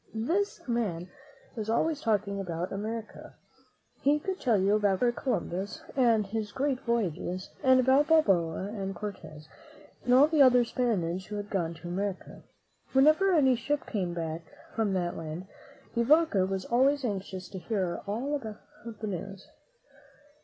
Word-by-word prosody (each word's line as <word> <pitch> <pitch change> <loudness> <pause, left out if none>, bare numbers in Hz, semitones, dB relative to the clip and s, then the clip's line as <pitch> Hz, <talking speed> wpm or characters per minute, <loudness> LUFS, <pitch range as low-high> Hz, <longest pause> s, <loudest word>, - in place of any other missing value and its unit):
This 340 - -1
man 190 -8 -2 0.4
was 220 -2 -4
always 295 +6 +1
talking 205 -2 0
about 175 -2 -4
America. 220 +2 -6 0.7
He 285 +2 +3
could 375 +5 -4
tell 235 -5 +3
you 195 +2 +3
about 205 -2 +2
Christopher 240 -1 +1
Columbus 200 -6 -2
and 230 -5 +3
his 210 +1 -4
great 270 0 -1
voyages, 185 - -2
and 260 -1 +5
about 265 +4 +4
Balboa 195 - +2
and 195 -3 -4
Cortez, 160 -6 -8 0.6
and 245 - 0
all 270 +3 +8
the 310 -1 +2
other 250 -2 +6
Spaniards 190 -8 -1
who 210 - -6
had 205 0 -5
gone 170 -4 -1
to 160 +1 -10
America. 190 +2 -4 0.5
Whenever 310 +8 +5
any 270 -7 +4
ship 280 +5 -2
came 180 -6 -2
back 165 -1 -3 0.3
from 215 -3 +1
that 175 -2 -1
land, 165 +3 -6 0.5
De 235 - +1
Vaca 290 - +4
was 190 -1 -3
always 270 +3 +2
anxious 190 -3 -4
to 190 - -7
hear 185 -1 -2
all 265 +8 -1
the 220 -4 -7 0.5
news. 195 0 -6
210 Hz, 150 wpm, -29 LUFS, 185-255 Hz, 0.7 s, all